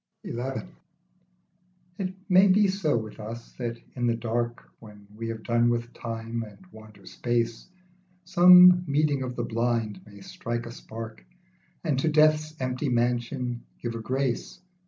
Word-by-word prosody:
XL 120 - -4 1.6
IT 185 -1 -3
may 190 0 +6
be 200 +2 +5
so 190 -9 +1
with 110 -1 -6
us, 115 +2 -8
that 115 -1 -3 0.2
in 120 -2 0
the 115 - +2
dark, 120 +1 -3
When 105 -2 -14
we 115 +1 -5
have 115 -1 -5
done 120 0 +2
with 120 0 -2
Time 115 0 -5
and 105 -3 -9
wander 110 -2 -15
Space, 115 -1 -2 0.6
Some 180 +1 +8
meeting 145 -1 +1
of 125 -1 -4
the 120 - -2
blind 115 -3 -1
may 100 -1 -14
strike 120 +4 -5
a 115 - -7
spark, 115 -1 -9 0.6
And 150 -6 0
to 160 - +1
Death's 155 0 +3
empty 130 +2 -2
mansion 120 +1 -1 0.2
give 120 -1 -4
a 115 - -5
grace. 130 +1 -2
120 Hz, 150 wpm, -27 LUFS, 115-145 Hz, 1.6 s, Some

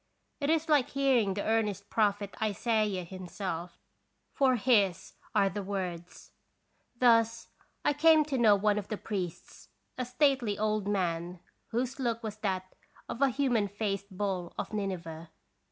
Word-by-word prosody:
It 285 -1 -1
is 320 +1 +2
like 295 -5 +3
hearing 255 -8 +2
the 205 - -2
earnest 210 -3 0
prophet 205 -2 +1
Isaiah 215 -2 0
himself, 180 -1 -6 0.6
for 265 -3 +3
his 205 -7 +2 0.2
are 195 - +4
the 200 +2 -3
words. 180 -3 -5 0.6
Thus 230 -1 +3 0.4
I - - +4
came 310 +1 +5
to 280 -3 -2
know 215 -3 +6
one 205 +1 +2
of 200 - -7
the 215 - -3
priests, 185 -6 -6 0.3
a 255 - 0
stately 250 -4 +1
old 215 -1 0
man 175 -3 -1 0.3
whose 250 +4 -2
look 235 -3 -1
was 215 -1 -5
that 185 -3 -3 0.3
of 240 - -6
a 275 - +5
human 245 -5 +1
faced 200 0 -3
bull 190 -4 -2
of - - -4
Nineveh. 170 -5 -4
210 Hz, 145 wpm, -30 LUFS, 190-240 Hz, 0.6 s, know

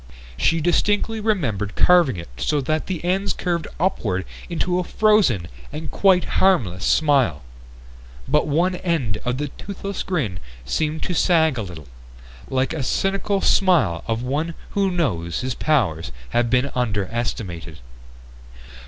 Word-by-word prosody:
She 165 - +2
distinctly 205 +6 +1
remembered 125 - -1
carving 175 - +4
it 85 - -7
so 150 - 0
that 155 +3 -1
the 175 -3 -4
ends 190 +3 +1
curved 170 -3 -2
upward 105 - 0 0.2
into 175 +1 0
a - - 0
frozen 190 - +3 0.2
and 155 0 -6
quite 190 -2 +4 0.2
harmless 110 - +2
smile. 135 - +2 0.8
But 150 - +2
one 175 +5 +1
end 150 - -1
of 125 +1 -1
the 145 +1 -3
toothless 200 -1 -5
grin 120 - -2 0.3
seemed 155 - -1
to 180 - -2
sag 160 -6 +3
a - - -1
little, 85 -8 -8 0.6
like 130 0 0
the 155 - -3
cynical 195 - 0
smile 170 - +3
of 115 +1 -1
one 155 +6 -2 0.2
who 200 -1 +1
knows 90 - -1
his 130 0 -2
powers 90 - 0 0.2
have 120 0 +1
been 130 +2 +2
underestimated. 100 -7 -3
150 Hz, 135 wpm, -22 LUFS, 110-180 Hz, 0.8 s, carving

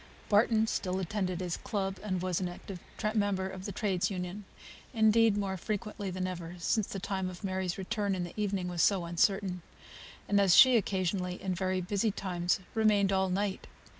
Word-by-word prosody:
Barton 220 +1 +4
still 185 -4 -2
attended 185 -1 -2
his 175 -2 -2
club, 195 -3 -3
and 185 -4 -2
was 185 -1 -1
an 180 - -1
active 180 +1 -8 0.3
member 200 -3 0
of 190 +1 -7
a - - -4
trades' 195 -4 0
union; 185 +1 -5 0.5
indeed, 220 -1 +4
more 195 -2 -2
frequently 205 +1 -4
than 185 0 -3
ever, 175 -2 -5
since 200 +4 0
the 195 - -5
time 190 -1 -2
of 180 +1 -10
Mary's 185 -2 -2
return 200 0 -1
in 180 - -2
the 175 - -7
evening 200 -3 -1
was 175 -2 -1
so 190 -4 +3
uncertain; 180 +2 +1 0.7
and, 200 0 +3
as 190 -3 +5
she 260 -1 +8
occasionally, 185 -3 0
in 190 -1 -2
very 185 +1 -1
busy 200 +4 0
times, 180 -3 -1
remained 210 -3 +3
all 190 -1 +2
night. 195 +1 -2
190 Hz, 180 wpm, -31 LUFS, 180-205 Hz, 0.7 s, she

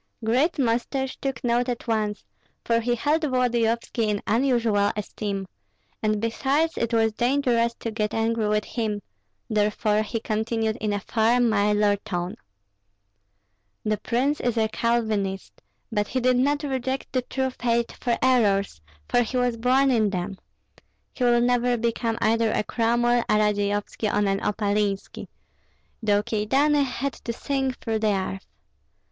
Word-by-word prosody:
Great 260 +9 +2
Mustache 260 +1 0
took 270 0 -4
note 245 +1 +1
at 245 +1 -4
once, 215 -2 -1 0.4
for 230 0 +2
he 240 +1 0
held 295 +7 +1
Volodyovski 235 -4 0
in 205 -1 0
unusual 230 -4 +2
esteem, 200 -2 -4 0.5
and 215 -1 +1
besides 275 +8 0
it 235 0 -1
was 225 -1 +3
dangerous 240 -1 +1
to 230 - -5
get 210 -1 -1
angry 225 -1 0
with 210 0 +1
him; 215 -4 -3 0.4
therefore 210 0 +1
he 215 +2 -3
continued 220 0 -1
in 215 -3 -2
a 205 - 0
far 230 +3 +2
milder 210 -3 +3
tone, 180 -4 -4 1.5
"The 215 -1 0
prince 265 +7 0
is 245 -1 -1
a 220 -1 +2
Calvinist; 220 -5 -1 0.3
but 210 -2 0
he 260 - -1
did 255 0 +3
not 285 +3 +1
reject 265 -1 -3
the 255 - +2
true 265 +1 -2
faith 235 -2 0
for 240 -2 -1
errors, 205 - +2 0.3
for 245 - +3
he 245 +2 -2
was 245 -1 +1
born 260 +4 +3
in 220 -4 +3
them. 185 0 -4 0.7
He 250 - -1
will 240 0 +4
never 245 0 +2
become 230 0 -1
either 225 0 +2
a - - 0
Cromwell, 240 +2 +2
a - - +4
Radzeyovski, 205 0 0
or 205 0 +1
an 195 0 +1
Opalinski, 205 -1 -1 0.7
though 205 -2 +2
Kyedani 270 +7 +2
had 270 +2 -3
to 235 - -6
sink 265 +1 -2
through 225 -2 -2
the 215 -2 +2
earth. 190 0 -4
230 Hz, 150 wpm, -25 LUFS, 210-250 Hz, 1.5 s, will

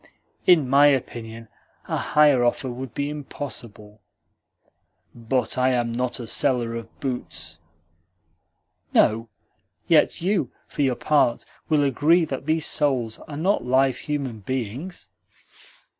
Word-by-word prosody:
"In 160 -7 +5
my 140 +3 +6
opinion, 115 -4 -2 0.4
a - - -2
higher 145 -4 +3
offer 120 +2 0
would 125 -1 -7
be 140 - -1
impossible." 120 -8 -7 1.1
"But 125 +2 -1
I 130 0 +3
am 120 -1 0
not 125 +2 -2
a 120 - -6
seller 120 0 +1
of 115 -1 -8
boots." 85 - -5 1.4
"No; 115 +1 +3 0.6
yet 165 -4 +3
you, 175 - 0 0.2
for - - -4
your 130 -3 +2
part, 130 -4 +1 0.2
will 150 -2 +3
agree 155 +5 +3
that 135 -1 -6
these 160 0 +1
souls 125 -6 0
are 145 - -7
not 190 +6 +1
live 130 +1 +2
human 140 -7 -4
beings?" 130 - -5
130 Hz, 125 wpm, -24 LUFS, 120-145 Hz, 1.4 s, my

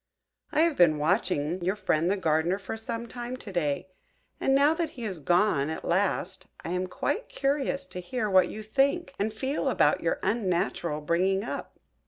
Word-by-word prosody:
I 310 - +3
have 330 -3 +2
been 165 -4 +5
watching 175 0 0
your 190 +3 +1
friend 175 -4 +1
the 200 - +1
Gardener 165 +1 +1
for 200 +2 -6
some 230 +1 -4
time 245 +2 -6
to 210 - -9
day; 165 +1 -1 0.5
and 270 - +2
now 285 +3 +5
that 330 -1 -1
he 240 - -6
is 190 -6 -4
gone 175 -2 +2
at 160 - -5
last, 190 +1 0 0.2
I - - -3
am 180 +1 -1
quite 405 - -2
curious 275 0 -1
to 180 - -7
hear 220 +4 -2
what 185 -3 +4
you 215 - -7
think 275 +8 +1
and 210 +2 0
feel 265 +7 -1
about - - +3
your - - 0
unnatural 175 -7 0
bringing 185 +5 +1
up." - - -6
195 Hz, 185 wpm, -28 LUFS, 175-245 Hz, 0.5 s, been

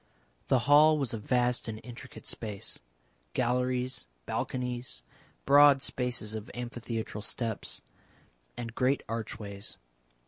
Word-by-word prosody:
The 130 - +5
hall 150 +2 +7
was 135 -5 -1
a 115 - -2
vast 125 +3 +1
and 110 -1 -4
intricate 125 +1 -10
space 105 -4 -3 0.5
galleries, 125 +1 0 0.2
balconies, 125 - -3 0.4
broad 145 0 +8
spaces 120 -4 -1
of 110 -1 -5
amphitheatral 120 -3 -4
steps, 110 +1 -3 0.8
and 115 -1 -5
great 130 +3 +2
archways. 110 -3 -4
120 Hz, 105 wpm, -30 LUFS, 110-130 Hz, 0.8 s, broad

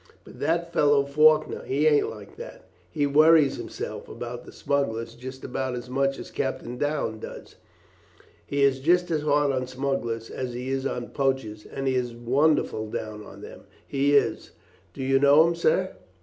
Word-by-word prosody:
But - - -14
that 170 +1 -1
fellow 145 -2 +4
Faulkner, 155 +2 +3
he 140 +3 0
ain't 150 -2 +4
like - - -11
that. - - -10 0.3
He 145 -3 0
worries 155 0 +5
hisself - - -6
about 120 0 -7
the - - -11
smugglers 115 -5 -2
just 130 +2 -9
about 130 0 -3
as 125 +1 -7
much 135 +1 +1
as - - -9
Captain 125 -2 -3
Downes 145 -5 -2
does. - - -9 0.9
He 140 0 -1
is 135 -1 +3
just 175 +5 +2
as 155 -2 +1
hard 145 -1 +2
on 130 -1 -2
smugglers 125 -3 -3
as 130 -2 -4
he 125 +2 -5
is 135 0 -1
on 120 -2 -4
poachers, 130 -6 -2
and 135 - -5
he 135 - +1
is 125 -2 -1
wonderful 120 -2 +1
down 105 -1 -5
on - - -12
them, - - -11 0.2
he 140 +1 +2
is. 140 - +1 0.4
Do 135 - -5
you 135 +1 +3
know 145 +3 +6
him, 170 - +1
sir?" 170 +2 +1
135 Hz, 175 wpm, -25 LUFS, 125-150 Hz, 0.9 s, know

